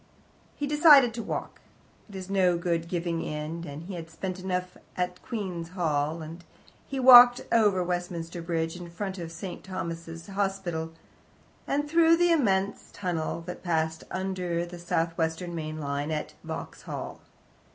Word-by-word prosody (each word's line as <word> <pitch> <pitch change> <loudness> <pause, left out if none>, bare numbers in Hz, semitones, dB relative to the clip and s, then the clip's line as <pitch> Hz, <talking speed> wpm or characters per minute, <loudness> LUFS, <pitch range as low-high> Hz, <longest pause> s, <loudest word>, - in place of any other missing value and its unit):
He 290 - -2
decided 290 -5 +7
to 230 - -4
walk 210 - -5 0.5
it 200 - -11
is 185 -1 -6
no 185 -3 +3
good 170 -1 -1
giving 170 -1 -2
in, 155 +3 -4
and 145 +2 -7
he 190 +3 -7
had 165 -2 -7
spent 185 +2 -5
money - - -10
enough 180 0 -4 0.2
at 180 0 -2
Queen's 185 -7 -4
Hall 160 -3 -1
and 165 +3 -9 0.4
he 275 - -3
walked 245 -1 +10
over 205 -5 +4
Westminster 175 -1 -3
Bridge, 165 -1 -2
in 175 -1 -8
front 190 +2 -5
of 165 -1 -6
St. 180 +1 -7
Thomas's 165 -3 -6
Hospital, 195 -5 -2 0.8
and 290 +1 0
through 330 +1 +5
the 350 0 +4
immense 200 -11 +1
tunnel 170 -3 -3
that 180 +1 -7
passes 160 -2 0
under 180 -2 -2
the 175 0 -9
South 170 -1 -1
Western 165 +2 -1
main 155 -1 -4
line 145 0 -2
at 155 -1 -3
Vauxhall. - - -6
175 Hz, 155 wpm, -28 LUFS, 165-195 Hz, 0.8 s, walked